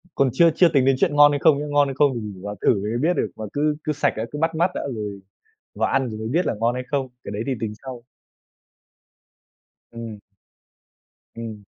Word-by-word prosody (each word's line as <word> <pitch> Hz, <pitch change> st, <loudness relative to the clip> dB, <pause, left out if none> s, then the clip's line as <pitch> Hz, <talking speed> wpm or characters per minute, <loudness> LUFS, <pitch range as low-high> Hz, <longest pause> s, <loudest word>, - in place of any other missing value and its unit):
còn 135 Hz, -1 st, +3 dB
chưa 170 Hz, -1 st, +6 dB
chưa 175 Hz, -, +5 dB
tính 135 Hz, -4 st, +3 dB
đến 135 Hz, 0 st, +4 dB
chuyện 145 Hz, -, +2 dB
ngon 145 Hz, 0 st, +7 dB
hay 145 Hz, -, 0 dB
không 145 Hz, -2 st, +4 dB
nhá. 150 Hz, -, -3 dB
Ngon 145 Hz, -1 st, +3 dB
hay 135 Hz, -, -4 dB
không 145 Hz, 0 st, +4 dB
thì -, -, -2 dB
mình 100 Hz, -3 st, -8 dB
vào 105 Hz, 0 st, -5 dB
thử -, -, +4 dB
mình 100 Hz, -, -3 dB
mới 110 Hz, +3 st, -1 dB
biết 170 Hz, +4 st, +3 dB
được, 105 Hz, -8 st, -1 dB
mà 110 Hz, -, -6 dB
cứ 150 Hz, +1 st, +1 dB
cứ 155 Hz, -, -1 dB
sạch 145 Hz, -, +1 dB
đã, 110 Hz, -, -2 dB
cứ 150 Hz, -, -5 dB
bắt 165 Hz, 0 st, 0 dB
mắt 175 Hz, +3 st, +2 dB
đã -, -, -2 dB
rồi 105 Hz, -2 st, -5 dB, 0.6 s
vào -, -, 0 dB
ăn 135 Hz, -2 st, +1 dB
rồi 110 Hz, -1 st, -6 dB
mới 110 Hz, -, -4 dB
biết 170 Hz, +8 st, +1 dB
là -, -, 0 dB
ngon 115 Hz, +2 st, +2 dB
hay 125 Hz, -, -3 dB
không, 140 Hz, -2 st, -1 dB, 0.2 s
cái -, -, -7 dB
đấy 105 Hz, +2 st, -3 dB
thì 135 Hz, -, +1 dB
tính 110 Hz, -2 st, -2 dB
sau. 125 Hz, -3 st, -8 dB, 1.9 s
Ừm. 115 Hz, -2 st, -7 dB, 1.2 s
Ừm. 110 Hz, -3 st, -7 dB
130 Hz, 240 wpm, -23 LUFS, 110-145 Hz, 1.9 s, ngon